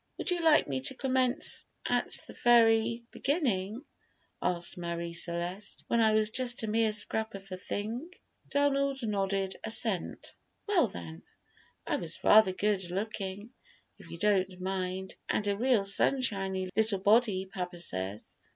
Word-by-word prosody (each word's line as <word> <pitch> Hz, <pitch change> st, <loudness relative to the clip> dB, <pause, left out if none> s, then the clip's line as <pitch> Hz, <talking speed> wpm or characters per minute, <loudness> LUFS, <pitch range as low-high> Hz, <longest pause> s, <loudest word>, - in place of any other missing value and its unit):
"Would -, -, -2 dB
you 350 Hz, -1 st, 0 dB
like 320 Hz, -2 st, +5 dB
me 135 Hz, -2 st, -2 dB
to 135 Hz, -, +1 dB
commence 260 Hz, +1 st, 0 dB, 0.2 s
at -, -, +1 dB
the -, -, -11 dB
very 230 Hz, -1 st, +4 dB
beginning," 245 Hz, -, -1 dB, 0.6 s
asked 175 Hz, -1 st, -1 dB
Marie 170 Hz, -1 st, -4 dB
Celeste, 175 Hz, +3 st, -3 dB
"when 235 Hz, -, +3 dB
I 220 Hz, -1 st, +4 dB
was 215 Hz, 0 st, +3 dB
just 245 Hz, -1 st, 0 dB
a -, -, -2 dB
mere 220 Hz, 0 st, +2 dB
scrap 220 Hz, +1 st, -2 dB
of 195 Hz, -1 st, -11 dB
a 185 Hz, -, -4 dB
thing?" 225 Hz, -, -4 dB, 0.4 s
Donald 275 Hz, -2 st, +1 dB
nodded 195 Hz, -2 st, -1 dB
assent. 220 Hz, -4 st, -2 dB, 0.3 s
"Well, 360 Hz, -, +4 dB
then, 80 Hz, -, -9 dB, 0.6 s
I -, -, 0 dB
was 165 Hz, -1 st, -5 dB
rather 215 Hz, -3 st, +7 dB
good 190 Hz, -1 st, 0 dB
looking, 200 Hz, +2 st, -4 dB, 0.5 s
if -, -, -14 dB
you -, -, -7 dB
don't 190 Hz, -1 st, +1 dB
mind, 190 Hz, 0 st, -3 dB
and 205 Hz, -, 0 dB
a 200 Hz, -, +1 dB
real 240 Hz, -1 st, +2 dB
sunshiny 195 Hz, -4 st, +1 dB
little 220 Hz, -1 st, +2 dB
body, 205 Hz, -1 st, +3 dB
papa 180 Hz, -1 st, -6 dB
says." 95 Hz, -, -4 dB
205 Hz, 145 wpm, -30 LUFS, 185-235 Hz, 0.6 s, rather